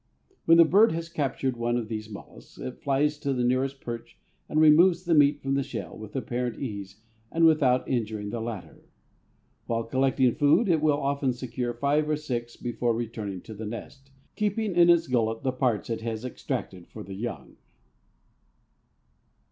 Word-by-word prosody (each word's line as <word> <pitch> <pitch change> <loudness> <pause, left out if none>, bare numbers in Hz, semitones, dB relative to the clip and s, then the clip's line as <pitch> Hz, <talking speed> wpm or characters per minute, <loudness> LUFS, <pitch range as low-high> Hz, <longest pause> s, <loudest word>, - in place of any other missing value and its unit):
When 165 0 +6
the 170 - +8
bird 200 +4 +5
has 165 0 -4
captured 135 -5 -2
one 120 +1 0
of 115 -3 -3
these 110 -1 -5
mollusks 100 - -12
it 130 - -7
flies 145 +2 +1
to 140 -2 -1
the 125 -1 -1
nearest 130 +2 0
perch 120 0 -7 0.3
and 155 - +1
removes 170 +4 +6
the 170 - +2
meat 145 -1 +5
from 135 0 -1
the 140 - +2
shell - - -6
with 110 -1 -10
apparent 125 -2 -2
ease 100 -4 -6 0.3
and 165 0 +3
without 140 -6 +3
injuring 110 -4 -2
the 115 - -4
latter. 115 -4 -7 0.8
While 115 0 -1
collecting 130 0 +2
food 150 +10 +3
it 160 -3 +3
will 150 -2 +3
often 140 -2 0
secure 120 -1 -4
five 145 +4 +1
or 150 - +1
six 120 -6 -4
before 120 -1 -1
returning 110 -5 -5
to 110 - -10
the 110 +1 -6
nest, 135 +4 -9 0.3
keeping 210 -1 -1
in 175 0 +6
its 170 -1 +5
gullet 115 -4 0
the 130 - +1
parts 125 -4 0
it 115 -1 -3
has 115 +1 -4
extracted 95 -6 -5
for - - -9
the 95 - -9
young." 115 +5 -6
130 Hz, 175 wpm, -27 LUFS, 115-150 Hz, 0.8 s, the